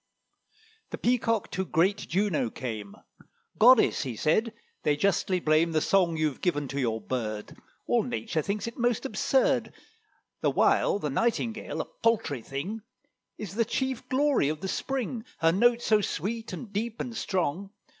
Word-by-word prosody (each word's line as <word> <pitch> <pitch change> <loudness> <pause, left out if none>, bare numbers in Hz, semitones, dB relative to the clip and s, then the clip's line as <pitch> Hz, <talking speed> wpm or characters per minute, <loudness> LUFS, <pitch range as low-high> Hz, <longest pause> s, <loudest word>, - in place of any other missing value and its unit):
The - - -5
Peacock 230 -3 +1
to 190 +2 -1
great 185 +2 +2
Juno 190 - 0
came: 110 -5 -6 0.6
"Goddess," 245 +2 +6
he 130 -5 -4
said, 215 - +1 0.3
"they 150 - +2
justly 185 +2 +1
blame 160 +1 +2
The 155 - +3
song 170 -1 +2
you've 155 -4 -1
given 145 -6 0
to 140 - -3
your 115 -4 0
bird: 110 -4 -4 0.3
All 240 - +2
nature 225 -7 -2
thinks 200 +7 -3
it 230 +2 -7
most 240 -1 +1
absurd, - - +1 0.7
The - - +3
while - - +3
the 150 -8 -3
Nightingale, 225 - -1
a - - -5
paltry 200 - 0
thing, 165 - -5 0.6
Is 200 -3 -6
the 230 +3 +2
chief 260 +2 -3
glory 275 - +2
of 155 0 -4
the 190 - -3
spring: 250 +1 -3
Her 165 0 +3
note 240 +6 +3
so 215 -1 +3
sweet, 220 +6 -3
and 220 -5 -8
deep, 225 +2 -3
and 240 -2 -4
strong." 190 -2 -1
195 Hz, 155 wpm, -28 LUFS, 155-230 Hz, 0.7 s, Goddess